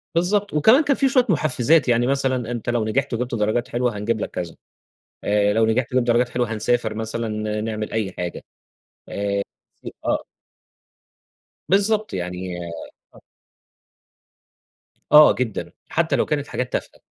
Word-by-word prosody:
بالضبط. 200 Hz, +3 st, +1 dB
وكمان 220 Hz, -, +5 dB
كان 280 Hz, -1 st, +2 dB
في 270 Hz, -, +2 dB
شوية 255 Hz, -2 st, +3 dB
مُحفِّزات. 155 Hz, -3 st, +2 dB
يعني 120 Hz, 0 st, +2 dB
مثلًا 130 Hz, -3 st, 0 dB
أنت 120 Hz, -1 st, -4 dB
لو 120 Hz, -2 st, 0 dB
نجحت 135 Hz, +4 st, -1 dB
وجِبت 120 Hz, +1 st, -2 dB
درجات 110 Hz, +3 st, 0 dB
حلوة، 120 Hz, -2 st, -1 dB
هنجيب 110 Hz, +2 st, -1 dB
لك -, -, -3 dB
كذا، 85 Hz, -2 st, -5 dB, 0.7 s
آآ 105 Hz, 0 st, +2 dB
لو 110 Hz, +1 st, +3 dB
نجحت 115 Hz, +3 st, 0 dB
وجِبت 125 Hz, -1 st, +2 dB
درجات 120 Hz, +1 st, +3 dB
حلوة، 120 Hz, -2 st, -2 dB
هنسافر 115 Hz, 0 st, 0 dB
مثلًا 110 Hz, -1 st, -3 dB
نعمل 110 Hz, -1 st, -4 dB
أي 105 Hz, -4 st, -1 dB
حاجة 90 Hz, -1 st, -5 dB, 0.7 s
آآ 100 Hz, 0 st, -1 dB, 0.4 s
ف -, -, -10 dB, 0.2 s
آه. -, -, 0 dB, 1.5 s
بالضبط. 210 Hz, +2 st, +2 dB
يعني 90 Hz, 0 st, -4 dB, 0.6 s
آه. -, -, -16 dB, 1.9 s
آه 150 Hz, 0 st, +9 dB
جدًا، 120 Hz, -5 st, -3 dB, 0.2 s
حتّى -, -, +1 dB
لو -, -, +1 dB
كانت 145 Hz, -1 st, -2 dB
حاجات 125 Hz, -, -4 dB
تافهة. -, -, -4 dB
120 Hz, 145 wpm, -22 LUFS, 110-140 Hz, 1.9 s, آه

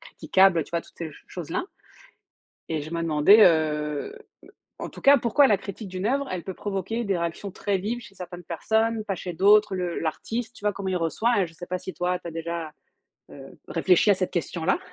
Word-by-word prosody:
critiquable? 195 Hz, -, +3 dB
Heu, -, -, -3 dB
tu -, -, -18 dB
vois? 170 Hz, -1 st, 0 dB
Toutes -, -, -20 dB
ces 165 Hz, -, -4 dB
ch 150 Hz, -, -13 dB
choses-là. 180 Hz, -, -4 dB, 1.1 s
Et 160 Hz, -2 st, -2 dB
je 155 Hz, -, -8 dB
me 170 Hz, 0 st, -2 dB
demandais, 165 Hz, +7 st, +6 dB
heu 150 Hz, -3 st, +2 dB
heu, -, -, -13 dB, 0.6 s
en -, -, -5 dB
tout -, -, -12 dB
cas 280 Hz, +1 st, +7 dB
pourquoi 270 Hz, +4 st, +4 dB
la 205 Hz, -, +4 dB
critique 200 Hz, +1 st, -8 dB
d'une 185 Hz, +2 st, -4 dB
oeuvre 275 Hz, +2 st, 0 dB
elle 180 Hz, -2 st, -4 dB
peut 190 Hz, -, -4 dB
provoquer 205 Hz, +4 st, -3 dB
des 195 Hz, -3 st, 0 dB
réactions 170 Hz, +4 st, -3 dB
très 195 Hz, +1 st, -1 dB
vives 225 Hz, +6 st, -3 dB
chez 195 Hz, -, -14 dB
certaines 180 Hz, -1 st, -9 dB
personnes, 220 Hz, +6 st, 0 dB
pas 200 Hz, -, -2 dB
chez 180 Hz, 0 st, -6 dB
d'autres, 205 Hz, +3 st, +4 dB
le 180 Hz, -2 st, -2 dB
l'artiste? 225 Hz, +8 st, -3 dB
Tu -, -, -14 dB
vois? 210 Hz, -, +2 dB
Comment 195 Hz, -1 st, -5 dB
il 185 Hz, -, 0 dB
reçoit, 175 Hz, +8 st, 0 dB
hein? 195 Hz, -3 st, +2 dB
Je 165 Hz, -, -16 dB
sais 175 Hz, +2 st, -9 dB
pas 185 Hz, 0 st, -3 dB
si 185 Hz, -, -8 dB
toi 180 Hz, 0 st, -1 dB
tu 175 Hz, -, -9 dB
as -, -, -5 dB
déjà, 165 Hz, -1 st, -5 dB, 0.6 s
heu, 135 Hz, -1 st, -12 dB
réfléchi 180 Hz, +4 st, +3 dB
à -, -, +6 dB
cette 185 Hz, -1 st, -2 dB
question-là. 170 Hz, +2 st, -1 dB
185 Hz, 225 wpm, -25 LUFS, 165-210 Hz, 1.1 s, cas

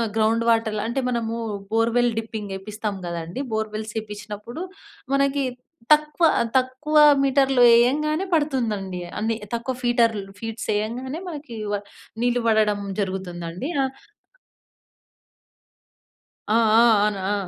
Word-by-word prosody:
Ground 225 Hz, +1 st, +2 dB
వాటర్ల 220 Hz, -2 st, +1 dB
అంటే, 235 Hz, +3 st, -1 dB
మనము 230 Hz, -1 st, -2 dB, 0.4 s
borewell 235 Hz, +2 st, +2 dB
dipping 220 Hz, -3 st, -6 dB
ఏపిస్తాం 210 Hz, +1 st, -5 dB
కదండీ! 170 Hz, +6 st, -4 dB
బోర్వెల్స్ 215 Hz, 0 st, -3 dB
ఏపిచినప్పుడు, 210 Hz, -, -7 dB, 0.5 s
మనకి 275 Hz, 0 st, +2 dB, 0.5 s
తక్కువ 305 Hz, +2 st, +4 dB, 0.3 s
తక్కువ 260 Hz, +4 st, 0 dB, 0.3 s
మీటర్లు 270 Hz, -1 st, +3 dB
ఏయంగానే 305 Hz, +9 st, +3 dB
పడుతుందండి. 230 Hz, -, 0 dB, 0.2 s
అన్ని 225 Hz, +1 st, 0 dB, 0.2 s
తక్కువ 235 Hz, +3 st, -2 dB
ఫీటర్లు 230 Hz, -5 st, +1 dB
ఫీట్స్ 225 Hz, 0 st, -5 dB
ఏయంగానే, 250 Hz, +8 st, -3 dB
మనకి 290 Hz, -7 st, -8 dB, 0.2 s
వా 205 Hz, -, 0 dB, 0.4 s
నీళ్లు 245 Hz, 0 st, +2 dB
పడడం 215 Hz, -2 st, +3 dB, 0.2 s
జరుగుతుందండి. 185 Hz, -, -4 dB
ఆహ్ 265 Hz, -1 st, 0 dB, 2.6 s
ఆ! -, -, +5 dB, 0.2 s
ఆ! -, -, +6 dB, 0.2 s
అవును, 210 Hz, -2 st, 0 dB
ఆ! -, -, +1 dB
230 Hz, 105 wpm, -23 LUFS, 210-260 Hz, 2.6 s, ఆ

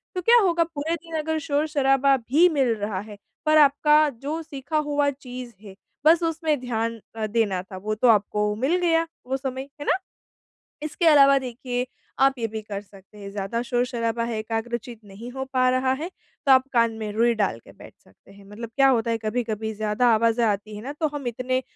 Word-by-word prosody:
तो 365 Hz, -, -1 dB
क्या 470 Hz, +7 st, +6 dB
होगा 340 Hz, -3 st, +3 dB
पूरे 325 Hz, 0 st, -3 dB
दिन 330 Hz, -1 st, -7 dB
अगर 315 Hz, +1 st, -1 dB
शोर-शराबा 285 Hz, -3 st, +2 dB
भी 275 Hz, +9 st, +3 dB
मिल 270 Hz, -7 st, +2 dB
रहा 205 Hz, -2 st, -3 dB
है, 210 Hz, +1 st, -9 dB, 0.3 s
पर 310 Hz, 0 st, +5 dB
आपका 300 Hz, +1 st, +5 dB
जो 285 Hz, +5 st, -5 dB
सीखा 295 Hz, 0 st, -4 dB
हुआ 290 Hz, 0 st, +2 dB
चीज़ 255 Hz, -3 st, -8 dB
है, 195 Hz, -2 st, -11 dB, 0.3 s
बस 330 Hz, +2 st, +6 dB
उसमें 320 Hz, -3 st, 0 dB
ध्यान 230 Hz, -2 st, -2 dB, 0.2 s
अ, 220 Hz, -1 st, -2 dB
देना 205 Hz, -4 st, 0 dB
था, 190 Hz, 0 st, -10 dB
वो 215 Hz, +3 st, -3 dB
तो 235 Hz, +4 st, +2 dB
आपको 210 Hz, -1 st, +2 dB
मिल 265 Hz, +10 st, +1 dB
गया, 330 Hz, -1 st, +2 dB, 0.2 s
वो 265 Hz, +1 st, -1 dB
समय, 265 Hz, 0 st, -5 dB
है -, -, -5 dB
ना? -, -, +2 dB, 0.9 s
इसके 310 Hz, +3 st, -2 dB
अलावा 275 Hz, -3 st, +7 dB
देखिए, 250 Hz, 0 st, -4 dB, 0.3 s
आप 270 Hz, 0 st, +4 dB
ये 230 Hz, -, -1 dB
भी 220 Hz, 0 st, -6 dB
कर 205 Hz, -2 st, -6 dB
सकते 195 Hz, +1 st, -18 dB
हैं, 200 Hz, -1 st, -8 dB
ज़्यादा 205 Hz, +3 st, -3 dB
शोर-शराबा 240 Hz, -1 st, -1 dB
है 230 Hz, -1 st, -3 dB
एकाग्र 225 Hz, +2 st, -2 dB
चित्त 235 Hz, -1 st, -12 dB
नहीं 205 Hz, +4 st, -10 dB
हो 265 Hz, +1 st, -4 dB
पा 255 Hz, -1 st, +3 dB
रहा 255 Hz, +1 st, +1 dB
है, 330 Hz, +3 st, -4 dB, 0.4 s
तो 275 Hz, -, +5 dB
आप 260 Hz, 0 st, +5 dB
कान 230 Hz, -1 st, +3 dB
में 215 Hz, -1 st, -4 dB
रुई 235 Hz, +2 st, +3 dB
डाल 200 Hz, -, 0 dB
के -, -, -17 dB
बैठ -, -, -14 dB
सकते 95 Hz, -, -22 dB
हैं। 200 Hz, 0 st, -16 dB
मतलब 225 Hz, +2 st, -8 dB
क्या 275 Hz, -1 st, +5 dB
होता 230 Hz, -3 st, +1 dB
है, 230 Hz, -, 0 dB
कभी-कभी 220 Hz, -1 st, -3 dB
ज़्यादा 215 Hz, +3 st, 0 dB
आवाज़ें 230 Hz, +1 st, +2 dB
आती 210 Hz, 0 st, -2 dB
हैं 210 Hz, -, -8 dB
ना, 275 Hz, +3 st, -5 dB
तो 310 Hz, +1 st, -1 dB
हम 285 Hz, -4 st, -4 dB
इतने 255 Hz, +2 st, -1 dB
245 Hz, 205 wpm, -24 LUFS, 220-285 Hz, 0.9 s, अलावा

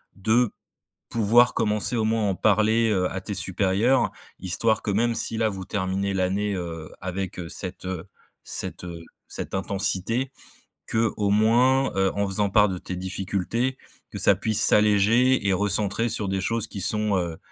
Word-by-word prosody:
de 110 Hz, +3 st, +1 dB, 0.6 s
pouvoir 115 Hz, +2 st, +3 dB
commencer 105 Hz, +3 st, +1 dB
au 110 Hz, -, 0 dB
moins 110 Hz, 0 st, 0 dB
à -, -, +1 dB
en -, -, -3 dB
parler, 110 Hz, +3 st, +2 dB
heu, 90 Hz, -3 st, 0 dB
à 95 Hz, -, -4 dB
tes 105 Hz, -, -5 dB
supérieurs 100 Hz, +6 st, +1 dB, 0.3 s
histoire 105 Hz, +5 st, +1 dB
que 105 Hz, -, -2 dB
même 115 Hz, +4 st, +1 dB
si 115 Hz, -, -1 dB
là 110 Hz, -1 st, +1 dB
vous 95 Hz, -2 st, -7 dB
terminez 100 Hz, 0 st, -2 dB
l'année, 95 Hz, +2 st, -1 dB
heu, 85 Hz, -3 st, -6 dB
avec, 95 Hz, -1 st, -4 dB
heu, 85 Hz, -2 st, -6 dB
cette, 95 Hz, -1 st, -5 dB
heu 90 Hz, -3 st, -5 dB, 0.4 s
cette, -, -, -2 dB
heu, 85 Hz, -1 st, -8 dB, 0.3 s
cette -, -, -6 dB
intensité 100 Hz, +6 st, 0 dB, 0.6 s
qu'au 110 Hz, -2 st, 0 dB
moins, 125 Hz, +6 st, +3 dB
heu, 95 Hz, 0 st, +1 dB
en 100 Hz, 0 st, 0 dB
faisant 100 Hz, +1 st, 0 dB
part 105 Hz, +1 st, +4 dB
de 95 Hz, -, -3 dB
tes 90 Hz, -, -7 dB
difficultés 95 Hz, +7 st, -2 dB, 0.3 s
que -, -, -7 dB
ça -, -, +5 dB
puisse 110 Hz, 0 st, +1 dB
s'alléger 105 Hz, +4 st, +4 dB
et -, -, +3 dB
recentrer 105 Hz, +3 st, 0 dB
sur 105 Hz, -2 st, -1 dB
des 95 Hz, 0 st, -1 dB
choses 115 Hz, +2 st, -1 dB
qui 100 Hz, -, -6 dB
sont, 105 Hz, +1 st, +2 dB
heu 85 Hz, -2 st, -4 dB
100 Hz, 170 wpm, -24 LUFS, 95-110 Hz, 0.6 s, ça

